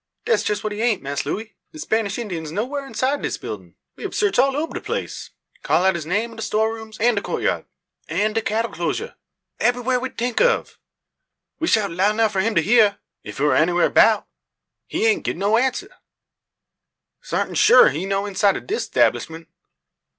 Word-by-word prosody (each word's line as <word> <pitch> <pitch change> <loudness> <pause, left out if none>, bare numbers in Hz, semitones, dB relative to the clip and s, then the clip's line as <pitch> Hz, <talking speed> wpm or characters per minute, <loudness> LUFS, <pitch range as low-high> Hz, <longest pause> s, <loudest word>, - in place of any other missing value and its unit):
"Dat's 465 - +2
jess 205 -1 -2
what 215 -1 -2
he 210 - -4
aint, 225 -7 +1
Mass 140 0 -3
Looey. 215 +7 -4 0.2
De - - -10
Spanish 220 -8 -1
Indyin's 175 -10 -5
no 205 +7 -1
whar 280 +1 -5
inside 270 +2 -1
dis - - -2
buildin'. - - -8 0.2
We - - -15
hab - - -5
sarch 410 -9 +1
all 270 +1 +3
oba 320 +2 -3
de - - -5
place; - - -5 0.3
call 180 - +2
out 190 - +4
his 165 -3 -5
name 210 +7 -1
in 225 - -13
de - - -6
store 220 +1 0
rooms, 220 -1 -10
an' 240 +2 +3
de 200 - -1
coatyard, - - -2 0.4
an' 215 +1 0
de 225 - 0
cattle 225 +2 -1
closure 430 - -3 0.5
ebbery 245 0 +1
wha 250 0 +1
we 260 +1 -4
tink 240 -1 -2
of. 485 -2 +1 0.8
We 325 - -1
shout 210 - +2
loud 195 +5 +1
nuf 220 -1 +2
for 190 -2 0
him 225 +2 0
to - - +3
hyeer, 215 -2 +4 0.3
ef - - -9
he 140 - -1
war 150 - +3
anywha 175 +2 +2
'bout. - - +5 0.6
He - - -2
haint 435 -5 +2
gib - - -2
no 200 +4 +2
answer. 260 +1 -2 1.3
Sartin - - -2
shoo 430 +3 +7
he 190 - 0
no 195 +1 -1
inside 200 0 +2
o' - - -4
dis 435 +5 -3
'tablishment." 165 0 0
220 Hz, 200 wpm, -21 LUFS, 195-250 Hz, 1.3 s, shoo